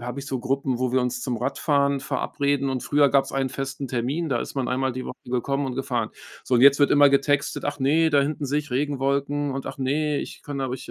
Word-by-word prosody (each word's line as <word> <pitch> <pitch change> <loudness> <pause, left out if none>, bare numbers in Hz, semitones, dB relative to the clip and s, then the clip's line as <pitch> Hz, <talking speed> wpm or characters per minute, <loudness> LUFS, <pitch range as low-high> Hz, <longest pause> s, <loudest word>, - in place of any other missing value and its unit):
habe 125 +2 -6
ich 140 - -6
so 130 -3 -3
Gruppen, 135 -1 -1
wo 130 -1 +1
wir 130 - +3
uns 125 -1 -2
zum 125 -3 -2
Radfahren 140 +3 +1
verabreden 140 0 -1
und 130 -1 -2
früher 145 -1 +3
gab's 135 0 +2
einen 135 -1 -1
festen 135 +1 -4
Termin, 130 +7 -2
da 120 -4 0
ist - - -6
man 130 - 0
einmal 130 +1 0
die 130 +1 -5
Woche - - -6 0.2
gekommen 140 +3 -1
und 130 -1 -5
gefahren. 125 -5 -2 0.3
So, 130 - -1
und 120 - +4
jetzt 140 +2 +7
wird 145 - +4
immer 145 0 +7
getextet: 140 +1 +1
„Ach - - -2
ne, 160 +4 +3
da 145 -1 +4
hinten 145 +1 -2
sehe 140 +2 0
ich 150 -3 -6
Regenwolken 140 +1 0
und 135 0 -5
ach - - -6
ne, 145 +2 0
ich - - -7
kann 140 -1 -5
aber 130 -1 -2
ich 130 - -9
135 Hz, 250 wpm, -24 LUFS, 130-145 Hz, 0.3 s, jetzt